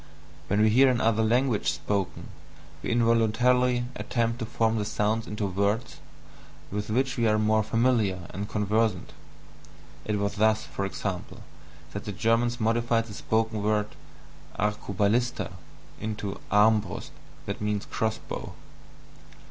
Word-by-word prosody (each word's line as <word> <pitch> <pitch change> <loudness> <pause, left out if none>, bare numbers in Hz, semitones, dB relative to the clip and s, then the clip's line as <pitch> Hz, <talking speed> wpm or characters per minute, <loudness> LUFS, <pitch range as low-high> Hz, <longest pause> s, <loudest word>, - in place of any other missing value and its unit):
When 100 +2 +2
we 110 - +5
hear 130 +4 +6
another 115 -3 +2
language 120 0 +2
spoken, 100 -2 -3 0.5
we - - -4
involuntarily 120 +2 +3
attempt 115 0 -1
to 115 - -3
form 115 -1 +1
the - - 0
sounds 110 +2 0
into 105 0 -3
words 100 +5 -1 0.7
with 105 +1 -3
which 130 +4 0
we 115 -1 +2
are 110 0 +3
more 110 0 +3
familiar 110 -5 +1
and 100 +2 -5
conversant 105 -1 0 0.9
it 105 -1 -1
was 100 0 -2
thus, 110 +1 +3
for 100 - -4
example, 95 -2 -5 0.5
that 100 - -6
the 105 - -3
Germans 115 +4 +1
modified 115 +1 +1
the 110 - -10
spoken 110 +1 0
word 105 0 +1 0.7
ARCUBALISTA 105 +3 0 0.5
into 105 -2 -4
ARMBRUST 105 -2 +2 0.8
(cross 110 -1 0
bow). - - -5
110 Hz, 125 wpm, -27 LUFS, 105-115 Hz, 0.9 s, hear